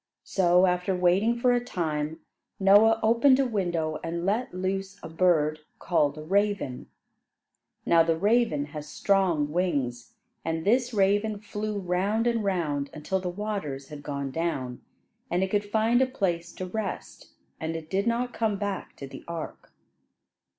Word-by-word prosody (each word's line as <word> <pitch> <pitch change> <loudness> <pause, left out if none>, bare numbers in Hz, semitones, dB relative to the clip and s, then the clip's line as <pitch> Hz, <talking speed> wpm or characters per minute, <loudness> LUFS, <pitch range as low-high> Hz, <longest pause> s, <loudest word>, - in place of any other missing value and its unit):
So, 180 -1 +3
after 180 +1 +1
waiting 185 +6 +2
for 245 +1 +3
a 245 0 +1
time, 160 -7 -3 0.4
Noah 205 +3 +6
opened 235 +4 +5
a 270 - +3
window, 175 -9 -1
and 170 +1 -3
let 220 +6 0
loose 195 +2 -3
a - - -5
bird 160 -3 +2 0.2
called 150 -4 +1
a 155 - -7
raven. 195 -6 0 1.0
Now 165 -1 +5
the 165 0 +2
raven 205 -6 +2
has 150 -1 -7
strong 175 -6 +1
wings; 140 -9 -2 0.3
and 160 0 -2
this 245 +4 +2
raven 205 +1 +2
flew 210 0 -4
round 195 +4 0
and 235 -2 +1
round 155 -8 -1
until 155 +5 -2
the 180 -1 -3
waters 175 -9 -4
had 150 -1 -8
gone 140 -2 -4
down, 135 -6 -3 0.5
and 180 -2 +1
it 190 - -2
could 205 0 +1
find 220 +4 +2
a 265 - +3
place 175 -9 -2
to 185 - -5
rest, 215 +4 -6 0.3
and 160 0 -3
it 160 -1 -6
did 195 +6 -1
not 240 +1 0
come 220 -3 0
back 205 -1 -4
to 140 - -8
the - - -10
ark. 170 -2 -7
185 Hz, 155 wpm, -27 LUFS, 160-210 Hz, 1.0 s, Noah